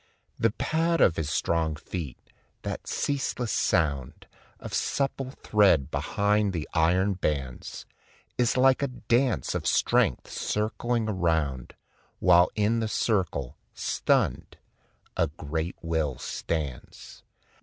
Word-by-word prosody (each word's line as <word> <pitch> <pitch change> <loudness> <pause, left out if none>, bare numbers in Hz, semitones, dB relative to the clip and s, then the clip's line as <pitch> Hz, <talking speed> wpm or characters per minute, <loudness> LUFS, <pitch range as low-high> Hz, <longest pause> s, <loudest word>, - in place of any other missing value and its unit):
The 115 - +4
pad 165 +8 0
of 80 - +5
his 80 -2 -2
strong 80 -1 0
feet, 80 -3 -6 0.5
that - - -5
ceaseless 135 -4 -1
sound 70 -7 0 0.3
Of - - -8
supple 135 -1 -1
tread 95 -10 +4
behind 105 0 +1
the 80 -3 -3
iron 90 +5 +3
bands, 70 -8 -3 0.5
Is 125 0 +1
like 130 +1 +5
a 140 - +1
dance 125 - 0
of - - -2
strength - - +2
circling 110 +2 -1
around, 80 - -1 0.4
While 90 +1 +5
in 110 +2 +2
the 110 - -1
circle, 95 - -1 0.2
stunned, - - 0 0.6
a 80 - +2
great 80 +3 -4
will 80 -5 -1
stands. 75 -7 -5
90 Hz, 110 wpm, -27 LUFS, 80-115 Hz, 0.6 s, of